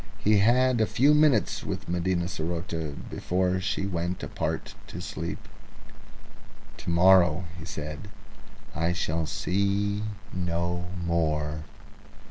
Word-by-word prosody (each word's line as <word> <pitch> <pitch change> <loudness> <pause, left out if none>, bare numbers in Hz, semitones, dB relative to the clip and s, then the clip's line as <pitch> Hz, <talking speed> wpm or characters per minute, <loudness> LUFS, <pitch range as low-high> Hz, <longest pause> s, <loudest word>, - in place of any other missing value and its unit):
He 105 0 +3
had 125 +3 +4
a 110 - +3
few 140 +5 +4
minutes 150 -7 +3
with - - -4
Medina 90 0 0
saroté 80 -3 -3
before 90 +1 0
she 100 0 -1
went 90 -1 -2
apart - - -3
to - - -7
sleep. - - -5 1.3
"To - - -6
morrow," 90 0 +5 0.2
he 80 - -8
said, 75 +2 -6 0.7
"I 85 +2 0
shall 80 -2 -1
see 100 +4 0 0.3
no 85 -1 -1 0.2
more." 75 -2 0
90 Hz, 110 wpm, -27 LUFS, 85-100 Hz, 1.3 s, morrow